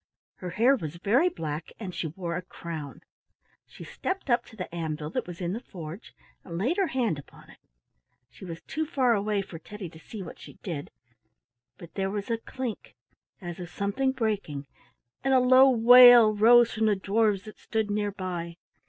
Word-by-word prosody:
Her 180 -4 -6
hair 235 +10 +4
was 160 - -6
very 235 - +2
black, 155 - -5
and 190 -5 -6
she 165 - -3
wore 170 +2 -5
a 175 - -2
crown. 165 -5 -8 0.7
She - - -12
stepped 380 -8 -4
up 240 0 +3
to 225 - -15
the 185 -4 -7
anvil 155 -2 -4
that - - -3
was 175 -1 -8
in 175 0 -2
the 225 - -3
forge 175 -3 -10 0.3
and 170 -2 -7
laid 250 - 0
her 390 -2 +2
hand 240 - -1
upon 145 - -15
it. - - -19 0.7
She 125 - -16
was 165 -3 -8
too 315 +1 -3
far 255 -5 +2
away 205 -1 0
for 170 -4 -10
Teddy 200 +1 -8
to 160 -1 -15
see 200 +4 -8
what 170 - -10
she - - -12
did, 160 -7 -5 0.9
but 170 -1 -13
there 195 -1 -1
was 205 +2 -4
a 230 - 0
clink 245 - -6 0.5
as 175 -1 -7
of 175 -1 -7
something 205 +9 -1
breaking, 205 - -3 0.6
and 270 0 +3
a - - +6
low 255 +2 +6
wail 245 -2 +8
arose 235 +2 +6
from 220 0 +1
the 210 - +3
dwarfs 205 0 +1
that 215 - -12
stood 220 -2 -2
near 205 0 -1
by. 175 -3 -5
205 Hz, 190 wpm, -27 LUFS, 170-235 Hz, 0.9 s, wail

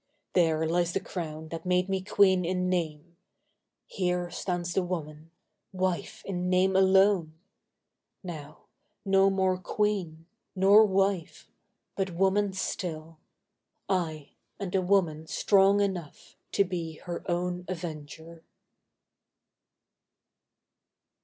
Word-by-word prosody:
There 160 -3 +2
lies 175 +1 +1
the - - +1
crown 160 -5 -6
that 165 0 -6
made 180 0 +1
me 190 -1 -1
queen 190 -1 +3
in 180 +1 -1
name! 170 -1 -3 0.7
Here 180 -2 -2
stands 175 -1 -3
the 190 - +2
woman—wife 175 +2 -5
in 180 -2 -2
name 185 +1 +3
alone! 190 -3 +4 0.9
Now, 155 -4 -9 0.4
no 195 0 +4
more 190 -1 +1
queen—nor 195 +2 +2
wife—but 195 0 -3
woman 195 +2 +2
still— 165 -4 -4 0.7
Ay, 160 -6 -2 0.3
and 195 -3 -5
a 190 - +2
woman 175 -5 +1
strong 200 +3 +4
enough 185 -7 -4 0.2
to 200 - +4
be 175 -4 -4
Her 170 +2 -7
own 180 +1 -1
avenger. 160 -1 -7
180 Hz, 100 wpm, -28 LUFS, 165-190 Hz, 0.9 s, alone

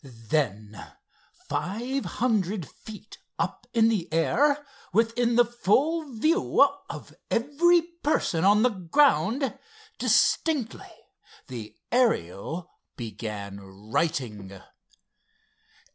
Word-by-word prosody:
Then, 115 -4 -3 0.7
five 215 - -2
hundred 205 - -1
feet 215 0 -12 0.2
up 175 +8 -3
in 225 -2 +4
the 200 -8 -1
air, 285 - +2 0.3
within 230 +3 +2
the 240 0 +6
full 275 - +1
view 325 - +4 0.2
of - - -8 0.2
every 325 +8 +3 0.2
person 180 - +1
on 205 +3 +5
the 250 - +5
ground, 230 - +2 0.4
distinctly 285 -8 +1 0.6
the 110 -4 -8 0.2
Ariel 170 - 0 0.3
began 105 -4 -6
"writing." 105 - -3
200 Hz, 85 wpm, -26 LUFS, -, 0.7 s, the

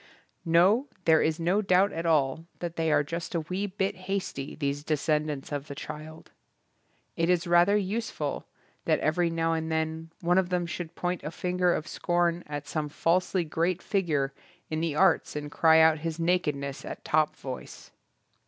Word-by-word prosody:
No, 185 - +4 0.2
there 160 -1 +5
is 160 +1 0
no 180 +5 +2
doubt 190 0 +3
at 165 +1 -3
all 155 0 +2
that 170 -1 -5
they 160 -1 0
are 145 -1 +4
just 170 +4 -5
a 165 - +1
wee 185 +5 -3
bit 195 0 -1
hasty, 185 -7 -4
these 145 -1 -2
descendants 150 -2 -1
of 145 0 -4
the 140 - -7
child. 155 +2 -9 0.8
It 165 +1 +1
is 180 -1 +2
rather 175 +4 +5
useful 200 -7 -3 0.4
that - - +3
every 170 +2 +1
now 165 0 0
and 160 0 -2
then 160 0 -2
one 175 +2 +3
of 185 -2 -1
them 180 -1 0
should 170 -1 -6
point 180 -1 -2
a - - -3
finger 180 +2 0
of 155 - -4
scorn 175 0 0
at 145 0 -5
some 150 -2 -2
falsely 180 +4 +1
great 165 +3 0
figure 155 -9 0 0.4
in 155 0 -1
the 165 -3 -1
arts 190 -1 +3
and 150 0 -5
cry 160 +1 +5
out 160 -1 +5
his 165 +1 -4
nakedness 150 -5 0
at - - -8
top 155 -1 +2
voice. 130 -2 -8
165 Hz, 175 wpm, -28 LUFS, 155-180 Hz, 0.8 s, there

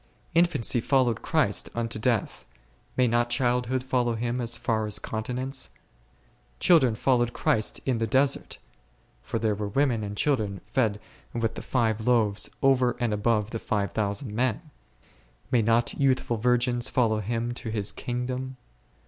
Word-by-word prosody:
Infancy 165 -8 +3
followed 130 -3 +2
Christ - - 0
unto 115 -1 -2
death, 115 -2 -1 0.5
may 125 -1 +4
not 120 +1 +1
childhood 125 +1 0
follow 125 -2 0
Him 120 +2 -2
as 120 0 0
far 110 -2 -1
as 105 - -3
continence? 125 +4 -4 0.9
Children 135 -10 +5
followed 120 0 +1
Christ 110 -1 0
in 125 -4 0
the 115 - 0
desert, 135 +4 +1 0.6
(for 115 - -3
there 110 -2 +1
were 105 0 -3
women 120 +1 +1
and 105 0 -5
children 105 -10 0
fed 110 -2 0 0.4
with 115 -1 0
the - - -7
five 110 -3 0
loaves 110 -5 +2
over 130 -3 +3
and 120 -3 0
above 105 0 +1
the 115 - -3
five 100 -2 -1
thousand 105 +2 -2
men,) 130 +7 -1 0.8
may 125 -3 +4
not 115 +2 +2
youthful 130 -4 +1
virgins 125 +1 +1
follow 110 -4 +2
Him 115 +3 -2
to 120 - -5
His 105 -2 -1
kingdom 125 +1 -4
120 Hz, 150 wpm, -26 LUFS, 110-125 Hz, 0.9 s, Children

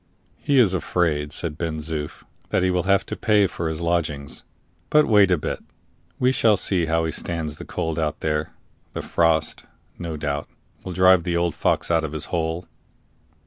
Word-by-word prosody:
"He 140 - +1
is 110 -7 +5
afraid," 80 -5 0
said 80 -2 -3
Ben 80 -2 -2
Zoof, 75 -1 -5 0.3
"that - - +1
he 95 - +2
will 90 0 -1
have 100 0 +3
to - - -5
pay 105 -3 +3
for 85 -3 -3
his 80 +1 -4
lodgings. 75 -5 -2 0.5
But 150 0 +5
wait 105 -3 +5
a 90 - +3
bit; 75 - -3 0.6
we 125 +1 +3
shall 110 -5 +3
see 90 -3 +1
how 80 0 +1
he 80 - -1
stands 80 -3 -3
the - - -7
cold 80 0 -3
out 75 -1 -2
there; 75 -1 -1 0.4
the - - -4
frost, 80 -2 +1 0.4
no 85 -3 -4
doubt, 75 -1 -3 0.3
will 90 - -5
drive 95 0 +5
the 85 0 -1
old 85 -1 +1
fox - - 0
out 80 -1 +3
of 80 -1 -4
his 80 0 -2
hole." 80 +1 -1
85 Hz, 185 wpm, -23 LUFS, 80-90 Hz, 0.6 s, is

